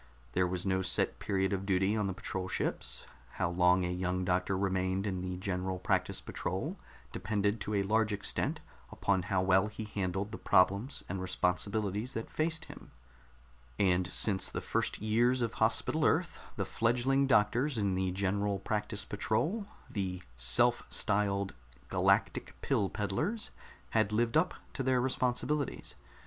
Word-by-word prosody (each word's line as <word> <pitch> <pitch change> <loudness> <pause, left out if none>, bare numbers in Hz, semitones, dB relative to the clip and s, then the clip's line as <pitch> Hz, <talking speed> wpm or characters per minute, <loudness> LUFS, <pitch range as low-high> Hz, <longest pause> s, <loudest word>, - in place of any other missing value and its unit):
There 90 0 +2
was 90 +1 -2
no 95 -1 +1
set - - 0
period 95 -1 0
of 95 -1 -1
duty 95 +1 +2
on 105 -2 0
the 95 - -2
patrol 95 0 -4
ships; - - -3 0.3
how 85 - -1
long 90 +1 +4
a - - -1
young 90 0 -1
doctor 90 +1 +1
remained 95 0 0
in 95 -3 -2
the 90 0 -4
General 95 0 -2
Practice 95 0 0
Patrol - - -4 0.3
depended 105 +1 -1
to 105 - -2
a 100 - +2
large 105 +2 +2
extent 100 -1 -1 0.3
upon 100 -2 +1
how 95 -2 +2
well 95 +1 +4
he 110 +1 -6
handled 100 -1 -2
the 110 - -6
problems 100 +8 +3
and 95 +1 -3
responsibilities 100 +5 -1
that 115 - -4
faced 160 +1 -1
him; - - -12 0.9
and 90 -2 +3
since 95 0 +3
the - - -3
first - - -1
years 120 +4 +2
of 115 - -1
Hospital - - +2
Earth, - - +2 0.2
the - - -1
fledgling 125 +4 +2
doctors 125 +3 +3
in 100 -3 +1
the 95 0 0
General 100 +2 0
Practice 105 +1 -2
Patrol 155 - -1 0.2
the 90 -3 -3
self 120 - +3
styled 100 -2 0 0.4
"Galactic - - +1
Pill 100 - +1
Peddlers" 130 - -2 0.4
had 110 -2 +2
lived 115 +2 +1
up 160 +4 +3 0.2
to - - -2
their 130 -1 +2
responsibilities. 130 +3 -1
100 Hz, 155 wpm, -32 LUFS, 95-110 Hz, 0.9 s, long